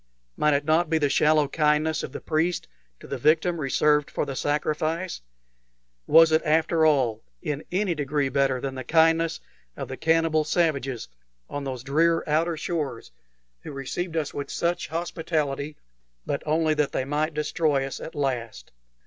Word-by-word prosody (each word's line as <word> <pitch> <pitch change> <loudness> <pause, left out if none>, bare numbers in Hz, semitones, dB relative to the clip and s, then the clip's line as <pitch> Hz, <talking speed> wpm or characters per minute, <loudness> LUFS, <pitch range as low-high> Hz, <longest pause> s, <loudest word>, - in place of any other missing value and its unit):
Might 150 -1 +3
it 145 +1 -1
not 160 +2 +2
be 160 - +2
the 145 -2 +1
shallow 150 +1 +3
kindness 150 +1 +1
of - - -6
the - - -6
priest 165 - -1 0.3
to - - -13
the 135 - -5
victim 160 +4 +2
reserved 150 +1 +2
for - - -2
the 135 - -5
sacrifice? 155 +5 -1 0.9
Was 165 0 +7
it, 155 +1 +4
after 160 +1 +3
all, 125 -7 +2 0.2
in 145 - -4
any 190 0 +1
degree 145 -2 -1
better 135 -1 +1
than 135 +1 -4
the 130 0 -6
kindness 165 +2 +3 0.4
of - - -5
the - - -5
cannibal 160 -1 +2
savages 145 -7 0 0.4
on 145 -1 -4
those 130 -3 -5
drear 165 +4 +2
outer 160 +2 +1
shores 150 -7 -4 0.5
who - - -8
received 160 +5 -4
us 155 -3 -2
with 140 -1 -5
such 170 +1 -1
hospitality, 155 -3 -2 0.5
but - - -2
only 155 0 +2
that 150 -2 0
they 130 - -1
might 150 +2 -1
destroy 150 -2 0
us 135 - -6
at - - -8
last? 120 - -3
150 Hz, 165 wpm, -25 LUFS, 140-165 Hz, 0.9 s, Was